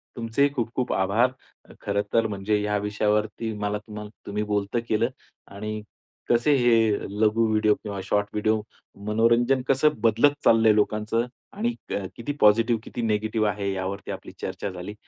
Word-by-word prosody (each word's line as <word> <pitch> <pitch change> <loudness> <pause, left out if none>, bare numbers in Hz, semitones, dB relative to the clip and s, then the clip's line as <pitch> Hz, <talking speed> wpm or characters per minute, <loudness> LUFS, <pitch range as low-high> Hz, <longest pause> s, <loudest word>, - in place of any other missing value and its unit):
तुमचेही 120 +5 +1
खूप-खूप 125 -1 -2
आभार. 105 +7 +2 0.4
अ, - - -13
खरं 100 0 0
तर 115 -1 +3
म्हणजे 105 0 -1
या 105 0 0
विषयावरती 105 +2 -1
मला 105 0 -1
तुम्हाला 105 0 -9 0.2
तुम्ही 105 +1 -2
बोलतं 105 +2 -1
केलं 115 +2 +2 0.5
आणि 105 +1 -4 0.5
कसे 120 +5 +4
हे 115 -4 +4 0.3
लघु 110 +1 +3
व्हिडिओ 110 -1 +3
किंवा 100 -2 -6
शॉर्ट 100 +1 0
व्हिडिओ 110 +1 +1 0.5
मनोरंजन 115 +4 +3
कसं 135 +3 +4
बदलत 115 +5 +4
चाललंय 110 -1 +6
लोकांचं 105 +2 +1 0.3
आणि 230 +4 -1 0.2
अ, 100 - -3
किती 120 +5 -4
पॉझिटिव्ह, 115 +2 +4
किती 120 - -6
निगेटिव्ह 110 -1 0
आहे 100 0 -2
यावरती 95 +1 -4
आपली - - -8
चर्चा - - -4
झाली. 90 +3 -7
110 Hz, 150 wpm, -25 LUFS, 105-115 Hz, 0.5 s, चाललंय